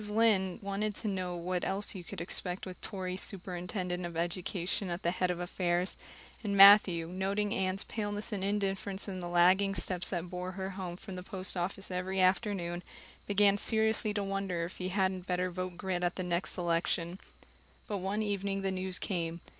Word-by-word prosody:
Lynde 210 Hz, -4 st, +3 dB
wanted 200 Hz, +1 st, -1 dB
to 220 Hz, -, -3 dB
know 185 Hz, -3 st, -2 dB
what 180 Hz, +1 st, -2 dB
else 195 Hz, +2 st, -1 dB
you 185 Hz, -3 st, -7 dB
could 165 Hz, -, -6 dB
expect 180 Hz, +1 st, -1 dB
with 185 Hz, -1 st, -7 dB
a -, -, -26 dB
Tory 185 Hz, -2 st, -3 dB
superintendent 180 Hz, -1 st, -2 dB
of 170 Hz, -1 st, -5 dB
education 180 Hz, +2 st, -1 dB
at 175 Hz, +2 st, -4 dB
the 170 Hz, -, +2 dB
head 180 Hz, 0 st, 0 dB
of 175 Hz, -1 st, -1 dB
affairs, 175 Hz, 0 st, 0 dB, 0.5 s
and 200 Hz, -2 st, 0 dB
Matthew, 195 Hz, -4 st, +9 dB
noting 195 Hz, +3 st, -1 dB
Anne's 190 Hz, +1 st, 0 dB
paleness 205 Hz, 0 st, -3 dB
and 195 Hz, -2 st, -2 dB
indifference 195 Hz, 0 st, -1 dB
and 185 Hz, -2 st, -4 dB
the 175 Hz, -, -4 dB
lagging 185 Hz, +3 st, +4 dB
steps 180 Hz, 0 st, -2 dB
that 175 Hz, -2 st, -2 dB
bore 180 Hz, +1 st, -4 dB
her 190 Hz, +1 st, -4 dB
home 185 Hz, -2 st, -5 dB
from 195 Hz, 0 st, -9 dB
the -, -, -5 dB
post 190 Hz, +1 st, -2 dB
office 185 Hz, +2 st, -3 dB
every 185 Hz, +1 st, -1 dB
afternoon, 185 Hz, -2 st, +1 dB, 0.5 s
began 205 Hz, 0 st, +5 dB
seriously 220 Hz, -1 st, +2 dB
to 205 Hz, -, 0 dB
wonder 195 Hz, -3 st, -1 dB
if 175 Hz, -, -9 dB
he 185 Hz, 0 st, -2 dB
hadn't 185 Hz, -1 st, 0 dB
better 180 Hz, 0 st, 0 dB
vote 185 Hz, 0 st, -4 dB
Grit 185 Hz, -2 st, -2 dB
at 175 Hz, -1 st, 0 dB
the 185 Hz, -, -3 dB
next 175 Hz, 0 st, -1 dB
election. 170 Hz, +1 st, 0 dB, 0.7 s
But 205 Hz, -3 st, -2 dB
one 195 Hz, +4 st, -1 dB
evening 200 Hz, -1 st, -1 dB
the 195 Hz, -, +1 dB
news 185 Hz, 0 st, -1 dB
came. 170 Hz, -3 st, -2 dB
185 Hz, 185 wpm, -32 LUFS, 180-195 Hz, 0.7 s, Matthew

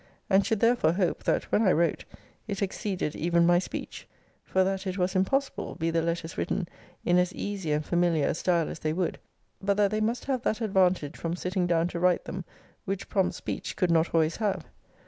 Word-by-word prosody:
], -, -, -41 dB
and 195 Hz, +1 st, +4 dB
should 220 Hz, -3 st, 0 dB
therefore 230 Hz, -8 st, +4 dB
hope, 180 Hz, -1 st, 0 dB
that, -, -, +2 dB
when -, -, +3 dB
I 195 Hz, -5 st, +4 dB
wrote, 170 Hz, 0 st, +1 dB, 0.4 s
it 200 Hz, -1 st, -2 dB
exceeded 190 Hz, -5 st, -2 dB
even 170 Hz, +1 st, +2 dB
my 175 Hz, 0 st, +5 dB
speech: -, -, -6 dB, 0.4 s
for 190 Hz, -, +2 dB
that 190 Hz, +1 st, -2 dB
it 185 Hz, +1 st, -3 dB
was 185 Hz, 0 st, 0 dB
impossible, 270 Hz, +9 st, 0 dB
be 165 Hz, -1 st, -1 dB
the 165 Hz, 0 st, +2 dB
letters 165 Hz, 0 st, -3 dB
written 185 Hz, -4 st, -1 dB, 0.4 s
in 175 Hz, +1 st, +4 dB
as 180 Hz, 0 st, +1 dB
easy 195 Hz, -6 st, -3 dB
and 150 Hz, 0 st, 0 dB
familiar 175 Hz, -4 st, +2 dB
a -, -, +1 dB
style 170 Hz, -1 st, +1 dB
as -, -, -6 dB
they 155 Hz, 0 st, -1 dB
would, 180 Hz, 0 st, -1 dB, 0.4 s
but 200 Hz, 0 st, +1 dB
that 205 Hz, -1 st, +3 dB
they 215 Hz, 0 st, 0 dB
must 230 Hz, +3 st, -1 dB
have 265 Hz, -3 st, -1 dB
that 215 Hz, -2 st, 0 dB
advantage 185 Hz, -8 st, +1 dB
from 165 Hz, 0 st, -2 dB
sitting 180 Hz, 0 st, -1 dB
down 170 Hz, -1 st, +2 dB
to 175 Hz, -, -4 dB
write 180 Hz, 0 st, +2 dB
them 185 Hz, -2 st, -5 dB, 0.4 s
which 195 Hz, -1 st, -4 dB
prompt 190 Hz, -2 st, +1 dB
speech -, -, -5 dB
could 180 Hz, -3 st, +1 dB
not 165 Hz, 0 st, +2 dB
always 160 Hz, 0 st, +2 dB
have. 210 Hz, -3 st, -1 dB
180 Hz, 210 wpm, -28 LUFS, 170-200 Hz, 0.4 s, my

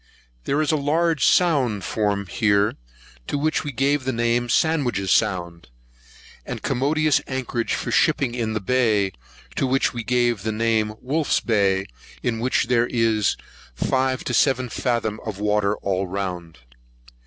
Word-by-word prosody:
There 150 Hz, +2 st, +1 dB
is 155 Hz, -, +1 dB
a 155 Hz, -, +2 dB
large 155 Hz, +2 st, +1 dB
sound 135 Hz, -, +2 dB
formed 100 Hz, -2 st, -1 dB
here, 100 Hz, -1 st, +2 dB, 0.5 s
to -, -, -1 dB
which 155 Hz, +1 st, 0 dB
we 145 Hz, -, -4 dB
gave 140 Hz, +2 st, +1 dB
the 130 Hz, -, -1 dB
name 120 Hz, 0 st, +1 dB
of 120 Hz, -, -4 dB
Sandwich's 125 Hz, -, +1 dB
Sound, 85 Hz, -, 0 dB, 0.7 s
and -, -, -7 dB
commodious 150 Hz, +3 st, +1 dB
anchorage 125 Hz, -3 st, -2 dB
for -, -, -4 dB
shipping 125 Hz, -4 st, +2 dB
in 115 Hz, -3 st, -2 dB
the 110 Hz, -, -1 dB
bay, 105 Hz, -3 st, +1 dB, 0.5 s
to 135 Hz, -, +1 dB
which 135 Hz, +1 st, +1 dB
we 120 Hz, -1 st, -4 dB
gave 120 Hz, -2 st, +1 dB
the 110 Hz, +2 st, -2 dB
name 110 Hz, -1 st, +1 dB
of 105 Hz, -, -10 dB
Wolf's 150 Hz, +4 st, +1 dB
Bay, 100 Hz, -4 st, +1 dB, 0.4 s
in 115 Hz, -2 st, -1 dB
which 125 Hz, +1 st, +1 dB
there 120 Hz, 0 st, +2 dB
is 115 Hz, -3 st, +1 dB, 0.4 s
from -, -, -2 dB
five 130 Hz, 0 st, +1 dB
to 125 Hz, -, -3 dB
seven 130 Hz, -1 st, +2 dB
fathom 115 Hz, -2 st, -1 dB
water 105 Hz, -1 st, 0 dB
all 95 Hz, -2 st, -2 dB
round. 90 Hz, -4 st, -5 dB
115 Hz, 155 wpm, -23 LUFS, 105-130 Hz, 0.7 s, a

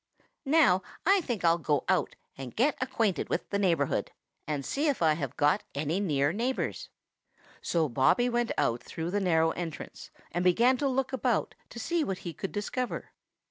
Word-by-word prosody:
Now 280 Hz, -, +5 dB, 0.2 s
I 390 Hz, +2 st, +5 dB
think 240 Hz, -, -3 dB
I'll 170 Hz, 0 st, +4 dB
go 150 Hz, -3 st, 0 dB
out -, -, +1 dB, 0.2 s
and 130 Hz, -3 st, -8 dB
get 275 Hz, +5 st, +2 dB
acquainted 225 Hz, -6 st, 0 dB
with -, -, -2 dB
the 200 Hz, -, 0 dB
neighborhood 165 Hz, -8 st, +1 dB, 0.4 s
and 145 Hz, -3 st, -2 dB
see 295 Hz, +3 st, 0 dB
if 285 Hz, -, +1 dB
I 155 Hz, -1 st, +5 dB
have 140 Hz, -4 st, -5 dB
got 150 Hz, +8 st, +3 dB
any 155 Hz, +5 st, -1 dB
near 150 Hz, -6 st, +1 dB
neighbors." 245 Hz, +5 st, -2 dB, 0.7 s
So 165 Hz, -2 st, +1 dB
Bobby 135 Hz, -, +3 dB
went 240 Hz, -1 st, 0 dB
out 120 Hz, +1 st, +1 dB
through 165 Hz, +7 st, -5 dB
the 205 Hz, -, +1 dB
narrow 165 Hz, -4 st, +3 dB
entrance 165 Hz, -3 st, -7 dB, 0.2 s
and 175 Hz, +2 st, -1 dB
began 235 Hz, +9 st, +4 dB
to 280 Hz, -, 0 dB
look 265 Hz, 0 st, -1 dB
about 260 Hz, -, 0 dB, 0.2 s
to -, -, -11 dB
see 330 Hz, +8 st, 0 dB
what 195 Hz, -8 st, -2 dB
he 170 Hz, -, -4 dB
could 195 Hz, +5 st, -5 dB
discover. 240 Hz, +4 st, -3 dB
185 Hz, 180 wpm, -29 LUFS, 155-245 Hz, 0.7 s, Now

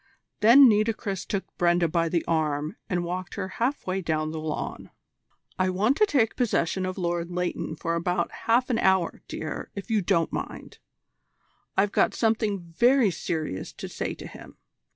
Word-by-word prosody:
Then 245 Hz, +6 st, +8 dB
Nitocris 215 Hz, -3 st, 0 dB
took 200 Hz, -2 st, -4 dB
Brenda 175 Hz, -1 st, +3 dB
by 165 Hz, +1 st, 0 dB
the 170 Hz, 0 st, 0 dB
arm 155 Hz, +1 st, -1 dB
and 175 Hz, -2 st, 0 dB
walked 180 Hz, +1 st, -4 dB
her 195 Hz, -2 st, -3 dB
half 245 Hz, +8 st, -2 dB
way 190 Hz, +1 st, -1 dB
down 155 Hz, -2 st, -1 dB
the 160 Hz, -, -4 dB
lawn. 155 Hz, -1 st, -4 dB, 0.7 s
"I 185 Hz, 0 st, +2 dB
want 205 Hz, +8 st, +2 dB
to 425 Hz, -, +4 dB
take 245 Hz, -, +2 dB
possession 190 Hz, -6 st, 0 dB
of 185 Hz, -, -4 dB
Lord 170 Hz, -1 st, -1 dB
Leighton 175 Hz, -2 st, -3 dB
for 165 Hz, +1 st, -2 dB
about 170 Hz, +1 st, -1 dB, 0.2 s
half 245 Hz, +3 st, +3 dB
an 230 Hz, -, +1 dB
hour, 190 Hz, -4 st, +2 dB
dear, 155 Hz, -, -5 dB
if 200 Hz, +3 st, -6 dB
you 215 Hz, -2 st, +3 dB
don't 175 Hz, -3 st, +1 dB
mind. -, -, -6 dB, 1.0 s
I've 200 Hz, +1 st, +3 dB
got -, -, +2 dB
something 210 Hz, -6 st, 0 dB
very 245 Hz, -2 st, +4 dB
serious 155 Hz, -, -4 dB
to -, -, -7 dB
say -, -, -4 dB
to -, -, -10 dB
him. -, -, -12 dB
185 Hz, 170 wpm, -26 LUFS, 170-215 Hz, 1.0 s, Then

